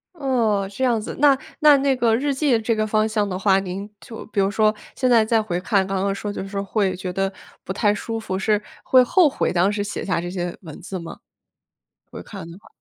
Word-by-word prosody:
哦， 230 - 0
这 260 - -4
样 235 -4 +2
子， - - -6
那 280 -2 +5 0.2
那 300 -2 +7
那 270 -1 +1
个 230 -3 +2
日 280 +3 0
记 265 -4 +2
这 225 +1 0
个 215 0 0
方 215 0 +1
向 215 -2 0
的 185 -1 -3
话， 195 0 +3
您 195 +2 -6
就 225 +7 -10
比 205 - -3
如 195 0 +3
说， 215 0 +3 0.2
现 255 -1 +1
在 230 -3 +5
再 225 0 +2
回 180 -5 -3
看， 195 0 +1
刚 190 -1 -1
刚 200 0 0
说 205 +1 -4
就 195 - -5
是 - - -7
说 200 -1 -3
会 195 -2 0
觉 185 0 -5
得 195 +1 -1 0.3
不 190 - -4
太 205 +1 +2
舒 225 +2 -4
服， 190 -4 -4
是 210 +1 +1 0.2
会 255 -1 +5
后 340 +6 +4
悔 275 - -1
当 185 +3 +2
时 205 -1 -1
写 205 - -5
下 180 -3 0
这 175 - -5
些 175 -1 -4
文 160 -6 -10
字 185 0 -6
吗？ 170 - -9 0.9
回 - - -9
看 190 -5 -9
的 170 - -11
话。 - - -19
210 Hz, 260 characters per minute, -22 LUFS, 190-230 Hz, 0.9 s, 那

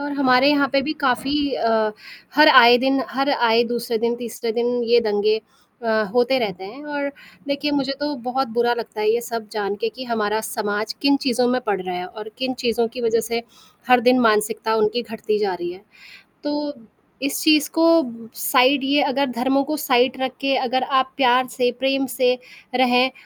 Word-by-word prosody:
और 290 0 -4
हमारे 270 -1 +4
यहाँ 285 -1 +2
पे 275 -1 +2
भी 305 +3 -2
काफ़ी 275 +3 0
अ, 220 -2 +1 0.4
हर 300 +2 +7
आए 240 -5 +8
दिन 270 +1 +1
हर 275 +2 0
आए 235 -3 +3
दूसरे 235 -1 -2
दिन, 235 +1 0
तीसरे 235 -1 -5
दिन 240 +1 -1
ये 235 +1 +4
दंगे 215 0 0 0.4
अ, 220 -1 +1
होते 245 +2 +3
रहते 190 -5 -4
हैं। 245 +10 -11
और 290 -1 -3 0.4
देखिए, 285 +1 -1
मुझे 275 -1 -1
तो 290 0 -2
बहुत 255 +2 -2
बुरा 240 0 +2
लगता 225 -2 -7
है 215 0 +2
ये 235 - +1
सब 230 -2 -6
जान 205 -2 -2
के 230 - 0
कि 245 +4 -9
हमारा 220 -3 -1
समाज 215 -1 -3
किन 280 -1 +4
चीज़ों 250 -1 +1
में 255 +1 0
पड़ 200 -3 0
रहा 185 0 -5
है 180 0 -5
और 215 +2 -10
किन 260 0 -2
चीज़ों 235 0 +1
की - - -4
वजह 230 0 +2
से 230 +1 -3 0.5
हर 250 -1 +6
दिन 250 +1 +4
मानसिकता 220 0 +1
उनकी 220 +2 +1
घटती 220 -2 -3
जा 200 -3 -1
रही 175 0 -5
है, 185 - -13 0.6
तो 295 0 -3 0.5
इस 280 - -1
चीज़ 305 -2 +3
को 325 - +4 0.5
साइड 260 +1 +3
ये 285 +2 +2
अगर 280 0 0
धर्मों 265 +3 0
को 305 +2 -3
साइड 260 -2 +2
रख 260 -1 -1
के, 275 -1 +1
अगर 255 0 -1
आप 265 -1 0
प्यार 255 -1 +3
से, 245 0 -1
प्रेम 270 +1 0
से 250 0 +1 0.4
रहें 250 0 +3
245 Hz, 195 wpm, -21 LUFS, 225-270 Hz, 0.6 s, आए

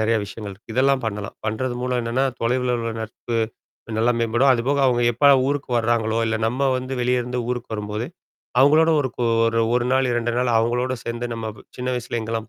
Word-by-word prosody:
நெறைய 110 +1 +2
விஷயங்கள் 100 0 -7
இருக்கு. 105 +3 -12
இதெல்லாம் 135 0 +3
பண்ணலாம். 105 -2 -4
பண்றது 120 +3 -2
மூலம் 125 0 0
என்னன்னா, 120 +4 0 0.2
தொலைவுல 125 +1 +1
உள்ள 115 0 -3
நட்பு 115 +2 -5 0.6
நல்லா 120 +2 +3
மேம்படும். 120 +4 +3
அதுபோக, 130 +4 0
அவுங்க 120 -1 +2
எப்பலாம் 135 +2 +5
ஊருக்கு 140 -2 -2
வர்றாங்களோ, 115 -1 +1
இல்ல 110 - 0
நம்ம 130 +4 +1
வந்து 130 +1 -5
வெளிய 125 0 +1
இருந்து 125 +1 -4
ஊருக்கு 125 -2 -4
வரும்போது, 105 +2 -4 0.5
அவங்களோட 155 +4 +5
ஒரு 130 - -1
கூ 125 - -2 0.2
ஒரு, 115 0 +1
1 125 0 +1
நாள், 130 -1 +2
2 120 0 0
நாள் 125 -1 +1
அவங்களோடு 125 +3 0
சேர்ந்து 120 +1 -3
நம்ம 110 -1 -4 0.3
சின்ன 125 0 -4
வயசுல 120 -1 -3
எங்கலாம் 115 0 -4
120 Hz, 190 wpm, -22 LUFS, 115-130 Hz, 0.6 s, எப்பலாம்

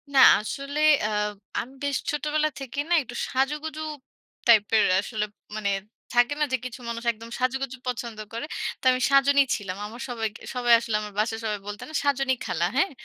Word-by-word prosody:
না - - +7 0.2
আসলে 275 +7 -4 0.3
আ - - -2 0.5
আমি 260 +3 -6
বেশ 285 -1 +1
ছোটবেলা 300 +1 0
থেকেই 275 +2 -3
না? - - +3
একটু 240 -2 -9
সাজুগুজু 300 +4 -1 0.7
টাইপের 220 -1 +5 0.2
আসলে 210 0 -2 0.3
মানে 205 -2 -1 0.4
থাকে 245 +4 +4
না - - +3
যে, - - +4
কিছু 255 0 -6
মানুষ 230 +1 -4
একদম 230 +1 -11
সাজুগুজু 260 0 -1
পছন্দ 235 -2 -3 0.2
করে? 230 +5 -3 0.3
তো - - -52
আমি 255 0 0
সাজুনি 280 +1 +6
ছিলাম। 195 -2 -5
আমার 235 +4 -8
সবাই 225 -2 -1 0.5
আসলে 230 -2 -2
আমার 210 -1 -7
বাসায় 225 +1 0
সবাই 210 -2 -1
বলত 205 0 -6
না - - -11
"সাজুনি 270 -2 +2
খালা," 170 - 0
হ্যাঁ? 375 +4 +3
250 Hz, 170 wpm, -26 LUFS, 220-280 Hz, 0.7 s, না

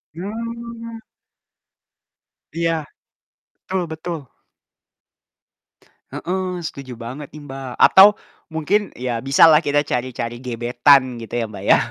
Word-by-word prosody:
Hmm. 230 +4 -7 1.5
Iya, 165 -2 -1 0.7
betul 190 0 -4
betul. 160 +1 -5 1.9
Heeh, 180 +1 -3
setuju 130 -3 -8
banget 130 +5 -8
nih 150 - -11
Mbak, 135 -1 -7
atau 190 +2 +9 0.4
mungkin 195 +6 0
ya 125 -1 -3
bisalah 150 +4 +6
kita 145 0 +2
cari-cari 120 -1 -3
gebetan 125 +2 +3
gitu 115 - -10
ya, 115 - -1
Mbak, 105 - -9
ya. - - +8
150 Hz, 100 wpm, -20 LUFS, 125-185 Hz, 1.9 s, atau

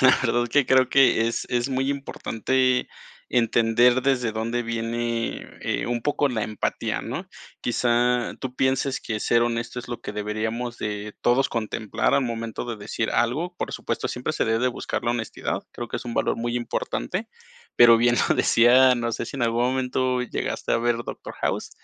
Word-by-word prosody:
La 130 0 +6
verdad 120 -1 +1
que 145 +4 +3
creo 130 0 +4
que 130 -4 +4
es 115 - -2
es 120 +1 0
muy 135 +1 0
importante 130 -2 0 0.4
entender 120 +1 +3
desde 125 -4 +1
dónde 115 +2 -2
viene, 115 0 -2
eh, - - -2
un 120 0 -1
poco 145 +1 +1
la 110 -3 -1
empatía, 105 0 -2
¿no? - - -5 0.3
Quizá 120 0 +1
tú 130 -1 -5
pienses 130 0 +1
que 110 -1 -4
ser 115 +2 +3
honesto 120 +1 -2
es 125 - -8
lo 120 -1 -5
que - - -6
deberíamos 110 +3 -3
de 105 0 -4
todos 125 +3 +3
contemplar 110 -2 -1
al 140 - +3
momento 115 -2 -4
de 120 -2 -4
decir 110 +2 -3
algo. 150 +10 0
Por - - -4
supuesto, - - -3
siempre - - -3
se - - 0
debe 115 0 +2
de 125 +2 +2
buscar 120 - -4
la 120 - +2
honestidad, 115 -3 -3
creo 120 - -6
que - - -3
es - - -9
un 120 - -4
valor - - +1
muy 120 +1 -2
importante, 185 - -3 0.5
pero 120 -1 +8
bien 120 +1 +3
lo - - +3
decía, 125 +2 +5
no 115 -1 -2
sé 115 - -3
si 140 - -7
en 130 - -2
algún 115 0 +1
momento 130 0 0
llegaste 125 - -3
a - - +3
ver 120 0 +1
Doctor - - -7
House, - - -1
120 Hz, 185 wpm, -24 LUFS, 115-130 Hz, 0.5 s, pero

